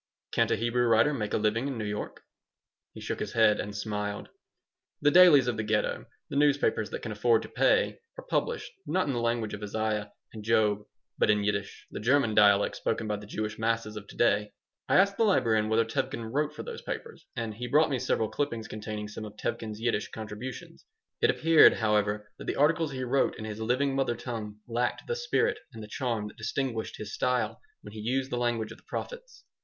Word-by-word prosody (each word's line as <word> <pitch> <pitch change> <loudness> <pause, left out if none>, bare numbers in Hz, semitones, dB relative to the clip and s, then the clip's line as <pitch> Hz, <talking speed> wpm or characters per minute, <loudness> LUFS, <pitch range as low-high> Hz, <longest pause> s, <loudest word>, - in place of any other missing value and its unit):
"Can't - - +2
a - - +3
Hebrew 120 +2 +1
writer 115 +6 +4
make 105 -6 -3
a - - +2
living 110 +5 +1
in 135 -3 -3
New 110 - -3
York?" 105 0 -5 0.7
He - - -11
shook - - -4
his - - -4
head 110 -2 +4
and 105 0 -4
smiled 105 -1 -3 0.7
The 145 - +4
dailies 170 -6 +8
of 120 - 0
the 110 - -1
Ghetto, 105 0 -1 0.2
the - - -7
newspapers 140 -6 +2
that - - -6
can 115 - -4
afford 110 +1 +2
to - - -9
pay, - - +2 0.2
are - - -9
published, 475 +1 -1 0.2
not 185 - +1
in 140 - -1
the 120 - -1
language 115 -2 -1
of 105 - -6
Isaiah 105 0 -2 0.2
and 110 -2 -8
Job, 105 -2 +3 0.4
but - - +3
in 105 -1 +3
Yiddish, 100 -1 -2
the - - -5
German 120 +1 +2
dialect 100 -1 +5
spoken 115 0 -2
by 105 - 0
the 105 0 -11
Jewish 105 0 -4
masses 115 -1 -1
of 105 -1 -8
to - - -13
day. 105 -3 +2 0.4
I - - +3
asked 200 +1 +4
the - - +3
librarian 115 - +3
whether 115 +1 +3
Tevkin 130 -2 -3
wrote 150 +1 0
for - - -6
those 470 -1 -7
papers, 460 -1 -7
and 115 -3 -3
he 125 +3 -5
brought 150 +4 +3
me 130 - 0
several 110 - 0
clippings 120 -7 -2
containing 105 0 -5
some 105 +1 -7
of 105 0 -9
Tevkin's 110 -1 -4
Yiddish 115 -3 0
contributions. 110 +3 -8 0.4
It - - +4
appeared, 165 0 +6
however, 105 -1 0
that - - -8
the - - -2
articles 160 +1 +2
he 130 -1 -4
wrote 130 +2 +1
in 110 - -6
his 110 0 -6
living 130 +5 +1
mother 135 -3 +1
tongue 110 -3 -6
lacked 120 +1 -1
the 475 - -2
spirit 485 0 0
and 110 -1 -8
the - - -8
charm 115 -2 -2
that 105 - -13
distinguished 115 0 -3
his 110 0 -7
style 125 -1 0 0.2
when - - -11
he 110 - -8
used 130 +5 -1
the 120 - -1
language 115 -2 -1
of 115 - -11
the - - -28
prophets. - - -7
115 Hz, 215 wpm, -29 LUFS, 105-135 Hz, 0.7 s, dailies